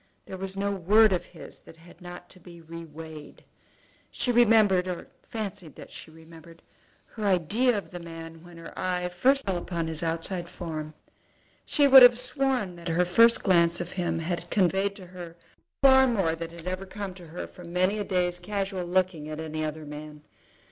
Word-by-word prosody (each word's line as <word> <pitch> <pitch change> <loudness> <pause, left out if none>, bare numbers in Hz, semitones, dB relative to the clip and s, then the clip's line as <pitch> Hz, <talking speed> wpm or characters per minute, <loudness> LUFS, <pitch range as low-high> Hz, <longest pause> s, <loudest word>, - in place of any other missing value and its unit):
There - - -8
was 190 +1 -6
no 200 +1 0
word 200 +3 +4
of 180 - -2
his - - -13
that - - -16
had 170 +2 -18
not 175 0 -10
to 185 - -16
be 170 -1 -14
re 165 +1 -9
weighed. 155 -1 -11 0.7
She 250 - -1
remembered, 215 -6 +4
or 180 -2 -5
fancied 205 - -7
that - - -12
she - - -11
remembered, 165 +1 -15 0.4
her 220 - -9
idea 205 +6 +2
of 200 - -7
the 175 - -7
man 165 -1 -10
when 175 -1 -14
her 165 - -10
eye 180 -1 -2
first 260 +10 +2
fell 190 -2 -1
upon 170 -1 -3
his 160 -1 -4
outside 170 +2 -2
form. 155 -4 -6 0.7
She 290 -2 +3
would 265 -1 +10
have 245 -1 +8
sworn 250 -6 -1
that 170 +1 -9
her 170 +2 +2
first 230 +7 +4
glance 170 -3 +3
of 175 0 -5
him 175 -3 -2
had 170 +1 -4
conveyed 195 +1 +1
to 195 -3 -11
her 175 -2 -10 0.5
far 265 -1 +7
more 195 -9 +1
than 165 0 -6
had 170 0 -12
ever 185 +1 -4
come 195 0 -6
to 180 -2 -13
her 165 +3 -6
from 175 -2 -12
many 185 +4 +1
a - - -1
day's 180 -2 -1
casual 195 -1 -3
looking 175 -4 -1
at 155 0 -6
any 155 0 -4
other 155 0 -5
man. 150 0 -9
180 Hz, 190 wpm, -27 LUFS, 165-200 Hz, 0.7 s, would